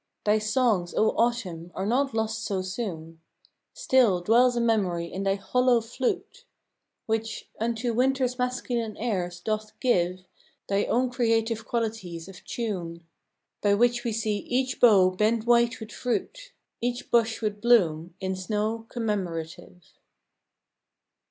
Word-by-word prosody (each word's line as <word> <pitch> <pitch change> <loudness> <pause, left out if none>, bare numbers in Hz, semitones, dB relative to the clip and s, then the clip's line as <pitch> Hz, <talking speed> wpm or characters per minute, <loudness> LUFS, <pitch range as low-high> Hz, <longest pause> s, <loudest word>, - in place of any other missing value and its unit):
Thy 210 +1 +4
songs, 215 -5 +1
O 220 - +4
Autumn, 190 -8 -1
are 190 - -2
not 260 +3 +1
lost 220 0 -1
so 195 -4 -2
soon! 170 -5 -6 0.5
Still 255 - +3
dwells 240 +7 +4
a - - +1
memory 200 -7 +1
in 185 +3 -6
thy 195 0 +1
hollow 250 +4 +2
flute, 250 - -3 0.6
Which, 225 -1 -3
unto 230 +1 -1
Winter's 255 +1 +1
masculine 245 -3 -2
airs, 180 -6 -2
doth 215 0 -3
give 185 -6 +1 0.4
Thy 200 +1 +1
own 250 +1 +1
creative 225 -2 0
qualities 215 -8 -3
of 195 -2 -12
tune, 175 -8 -4 0.6
By 200 -1 +3
which 240 +2 +2
we 235 - -1
see 215 -1 -1
each 255 +5 -2
bough 195 -6 +6
bend 215 +4 +1
white 235 0 +3
with 220 0 -9
fruit, - - -3 0.3
Each 245 +1 -3
bush 230 -1 +2
with 210 -1 -2
bloom, 175 -8 +3
in 190 -1 -2
snow 215 +4 -2
commemorative. 180 -6 -4
220 Hz, 130 wpm, -26 LUFS, 190-240 Hz, 0.6 s, bough